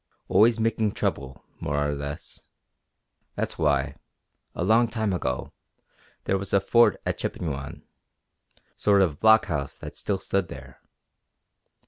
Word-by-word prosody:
Always 115 +2 +5
making 110 -2 +1
trouble, 65 -1 -3
more 70 0 -2
or 75 - -1
less. 70 +1 -7 0.9
That's - - -3
why, 70 -2 +1 0.6
a - - -2
long 115 +5 +4
time 110 -3 -1
ago, 65 -8 -3 0.7
there 95 - 0
was 100 0 -7
a 100 - +6
fort 115 +5 +4
at - - -2
Chippewyan 70 -4 -4 0.9
sort 100 -2 +4
of 75 -5 -1
blockhouse 85 -11 +3
that - - -9
still 100 - -1
stood 95 -1 -1
there. 65 -4 -11
90 Hz, 125 wpm, -26 LUFS, 70-110 Hz, 0.9 s, a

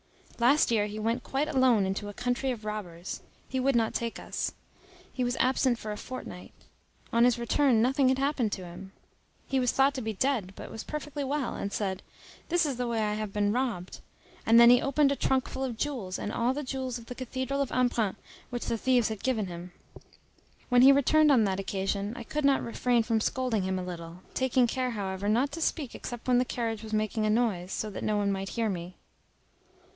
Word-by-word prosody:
Last 250 +3 +4
year 210 -2 +2
he 210 +1 -7
went 230 +3 -1
quite 275 +5 -1
alone 260 -8 +3
into 195 +2 -3
a 205 - -9
country 245 +2 -1
of 230 -4 -4
robbers. 185 -5 -5 0.3
He 260 - -2
would 270 0 +2
not 225 -1 +2
take 235 -1 -2
us. - - -3 0.6
He 255 - -1
was 245 +1 0
absent 255 0 +2
for 215 -2 -6
a 210 - -4
fortnight. 255 +4 -8 0.6
On 235 0 +5
his 245 -1 +4
return 235 0 +3
nothing 265 +1 +3
had 260 - +2
happened 270 -5 0
to 185 - -5
him; 185 +3 -10 0.5
he 270 - +1
was 250 -2 +2
thought 270 +1 +3
to 265 - -4
be 220 -1 -3
dead, 215 -4 0
but - - -9
was 225 - -6
perfectly 295 -1 -5
well, 275 -1 -1
and 200 - -4
said, 190 -3 -2 0.5
"This 345 -1 +3
is 275 -5 -2
the 245 -1 -1
way 230 -1 0
I 210 0 0
have 215 -1 -3
been 205 0 +1
robbed!" 225 -7 -2 0.4
And 230 +1 +6
then 235 0 +9
he 245 +1 +6
opened 280 +1 +3
a - - +1
trunk 265 -1 +1
full 265 - -4
of 245 -4 -3
jewels, 235 -10 -3
all 235 +5 -1
the 295 - -3
jewels 260 -2 -3
of 235 - -12
the 250 - -7
cathedral 260 +2 -3
of 275 - -1
Embrun, 240 -5 +1 0.3
which 245 -1 -4
the 230 - -1
thieves 250 -2 +3
had 215 -3 -5
given 235 -6 0
him. 175 0 -8 1.0
When 245 -1 +5
he 265 +2 +9
returned 300 +2 +5
on 250 -5 +5
that 195 -2 0
occasion, 195 +2 -2
I 240 - -6
could 300 +5 -2
not 275 -1 +3
refrain 235 0 +1
from 225 -1 +1
scolding 250 -3 0
him 190 0 -1
a 185 - -3
little, 170 -1 -7
taking 260 -1 +2
care, 255 +1 -1
however, 200 -2 -3
not 245 +6 +2
to 330 +3 -6
speak 300 -5 -1
except 240 -1 -7
when 250 -1 +4
the 250 - +2
carriage 225 -3 -3
was 220 -1 -8
making 215 0 0
a - - +1
noise, 210 -5 +1
so 215 - -3
that - - -6
no 210 -1 +1
one 200 -1 +1
might 195 0 -3
hear 230 -2 -1
me. 180 -1 -5
235 Hz, 220 wpm, -29 LUFS, 210-260 Hz, 1.0 s, then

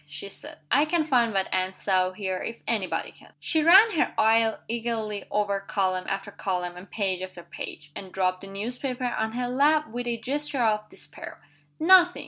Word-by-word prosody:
she 150 +6 -7
said. 200 - -10
"I 290 +2 +5
can 315 0 +1
find 245 -6 +3
what 195 -2 0
Anne 185 0 0
saw 185 -1 +1
here 190 -1 -3
if 230 - -5
any 210 -5 0
body - - -3
can!" - - -18
She 315 - +1
ran 385 +8 +8
her 325 - 0
eye 225 0 +4
eagerly 225 -3 -3
over 205 -1 0
column 185 -2 -1
after 195 +1 -3
column 180 -3 -3
and 180 +1 -11
page 190 -3 -1
after 185 -2 -8
page 150 -2 -8
and 190 -2 -8
dropped 185 -1 0
the 195 - -9
newspaper 245 +6 -4
on 220 0 -2
her 245 +1 -2
lap 290 +3 +3
with 245 +2 -5
a 235 -1 -1
gesture 275 +2 -2
of 215 -1 +1
despair. 150 0 -10 0.4
"Nothing!" 360 +1 +6
215 Hz, 190 wpm, -26 LUFS, 190-250 Hz, 0.4 s, ran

